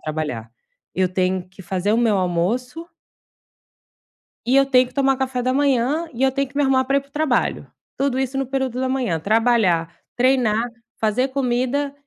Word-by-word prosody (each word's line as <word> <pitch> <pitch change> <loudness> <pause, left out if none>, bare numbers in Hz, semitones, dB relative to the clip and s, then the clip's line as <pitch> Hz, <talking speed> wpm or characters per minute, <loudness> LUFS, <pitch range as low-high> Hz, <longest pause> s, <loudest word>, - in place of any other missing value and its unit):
trabalhar. 150 -8 -4 0.4
Eu 185 -1 +1
tenho 185 0 -1
que 190 +1 -14
fazer 190 +3 -1
o - - +3
meu 225 -4 +2
almoço 230 - -1 1.6
E 260 - +3
eu 275 0 +5
tenho 255 -2 +4
que 250 - -18
tomar 270 -1 +2
café 260 -1 -2
da 255 +1 0
manhã 280 +3 +1
e 240 - -6
eu 265 0 +4
tenho 275 0 -1
que 280 - -22
me 290 - +2
arrumar 265 -2 +2
para 275 +1 +2
ir - - +3
para 280 - -24
o - - -41
trabalho. 295 -3 0 0.3
Tudo 270 -1 0
isso 265 0 -2
no 270 - 0
período 260 -1 -2
da 260 - 0
manhã: 250 -11 -1
trabalhar, 205 -5 +2 0.2
treinar, 245 -2 +2 0.3
fazer 225 +5 +1
comida 260 +2 -1
250 Hz, 185 wpm, -21 LUFS, 205-270 Hz, 1.6 s, eu